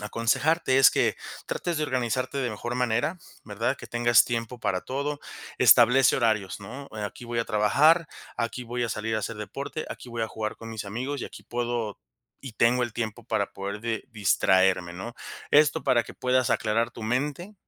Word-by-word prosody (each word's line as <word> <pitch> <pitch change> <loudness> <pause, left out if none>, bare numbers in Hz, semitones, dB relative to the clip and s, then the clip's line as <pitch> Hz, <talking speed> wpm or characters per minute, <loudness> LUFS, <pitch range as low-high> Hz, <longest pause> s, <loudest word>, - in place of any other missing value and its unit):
aconsejarte 130 +7 +1
es 135 - +8
que, - - +1 0.3
trates 175 -2 -2
de - - -1
organizarte 130 -1 -1
de 125 -3 -1
mejor 120 +3 -4
manera, 125 +8 0 0.3
¿verdad? - - -2
Que - - -11
tengas 120 0 +4
tiempo 120 0 -4
para 95 -3 -1
todo, 140 +2 -3 0.4
establece 125 +3 +6
horarios, 110 -5 0
¿no?, 125 +8 -8
eh, 105 - -4
aquí 105 +4 -7
voy 120 0 -2
a - - -2
trabajar, 150 +12 +4 0.3
aquí 120 +1 -3
voy 120 +1 -2
a - - -2
salir 110 +1 -2
a - - +1
hacer 105 +1 -4
deporte, 140 +8 -5
aquí 125 - -8
voy 115 -1 -3
a 110 - -1
jugar 110 -1 -4
con 115 0 -9
mis 110 -2 -5
amigos 125 +7 -4
y - - -4
aquí - - -10
puedo 120 -3 -3 0.4
y 135 -3 -8
tengo 120 +2 +3
el 120 - -6
tiempo 110 -2 -4
para - - -1
poder 100 +1 -5
de 115 -1 -3
distraerme, 95 -3 +2
¿no? 95 +7 -7 0.4
Esto 150 +1 +4
para 120 -2 +3
que - - -11
puedas 130 -1 +1
aclarar 115 +2 +1
tu 115 - -9
mente, 145 - -2
120 Hz, 190 wpm, -26 LUFS, 110-130 Hz, 0.4 s, es